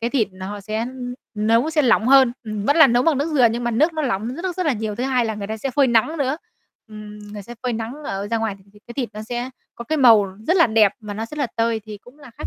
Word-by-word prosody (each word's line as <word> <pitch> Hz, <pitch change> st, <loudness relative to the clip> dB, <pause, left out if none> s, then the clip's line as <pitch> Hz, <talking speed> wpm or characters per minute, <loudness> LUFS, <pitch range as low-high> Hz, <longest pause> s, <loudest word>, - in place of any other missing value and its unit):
Cái 235 Hz, +1 st, -1 dB
thịt 235 Hz, -7 st, +1 dB
nó 190 Hz, +2 st, -7 dB
sẽ 215 Hz, +2 st, -4 dB
ư, 250 Hz, -1 st, -6 dB, 0.2 s
nấu 230 Hz, +8 st, +2 dB
sẽ 305 Hz, -2 st, +2 dB
lỏng 230 Hz, -2 st, +3 dB
hơn, 265 Hz, -3 st, +6 dB
ừm, 215 Hz, -2 st, -4 dB
vẫn 285 Hz, +6 st, +2 dB
là 315 Hz, -, +9 dB
nấu 245 Hz, 0 st, +2 dB
bằng 315 Hz, -5 st, +2 dB
nước 295 Hz, +3 st, -1 dB
dừa 250 Hz, -4 st, +6 dB
nhưng 235 Hz, +1 st, -3 dB
mà 240 Hz, -, 0 dB
nước 305 Hz, +9 st, +2 dB
nó 310 Hz, -1 st, -2 dB
lỏng 230 Hz, 0 st, -2 dB
rất 360 Hz, +1 st, -4 dB
rất 365 Hz, -, -1 dB
là 295 Hz, -, +3 dB
nhiều. 215 Hz, -2 st, -3 dB
Thứ 245 Hz, +4 st, -3 dB
hai 255 Hz, -3 st, +1 dB
là 220 Hz, -1 st, -2 dB
người 200 Hz, -1 st, -6 dB
ta 220 Hz, +1 st, -4 dB
sẽ 265 Hz, +5 st, -3 dB
phơi 280 Hz, 0 st, +3 dB
nắng 240 Hz, +6 st, +2 dB
nữa. 275 Hz, +1 st, 0 dB, 0.5 s
Ừm, 210 Hz, -1 st, -10 dB
người 205 Hz, -1 st, -7 dB
sẽ 240 Hz, +5 st, -10 dB
phơi 250 Hz, -, -1 dB
nắng 225 Hz, +2 st, -4 dB
ở 195 Hz, -2 st, -4 dB
ra 230 Hz, -, 0 dB
ngoài 220 Hz, -3 st, -2 dB
thì 195 Hz, -, -23 dB
cái 210 Hz, -, -19 dB
cái 235 Hz, -, -10 dB
thịt 250 Hz, -3 st, -2 dB
nó 215 Hz, -, -7 dB
sẽ 240 Hz, +3 st, -4 dB, 0.2 s
có 235 Hz, -, -8 dB
cái 310 Hz, +4 st, -1 dB
màu 225 Hz, -6 st, +7 dB, 0.2 s
rất 355 Hz, +3 st, +3 dB
là 335 Hz, -, +6 dB
đẹp 220 Hz, -3 st, +4 dB
mà 210 Hz, -2 st, -7 dB
nó 225 Hz, +2 st, -4 dB
rất 300 Hz, +5 st, -9 dB
là 280 Hz, -, +1 dB
tơi 230 Hz, -1 st, 0 dB
thì 210 Hz, -1 st, -9 dB
cũng 255 Hz, +5 st, -18 dB
là 285 Hz, -4 st, -13 dB
khác -, -, -4 dB
235 Hz, 305 wpm, -21 LUFS, 215-270 Hz, 0.5 s, là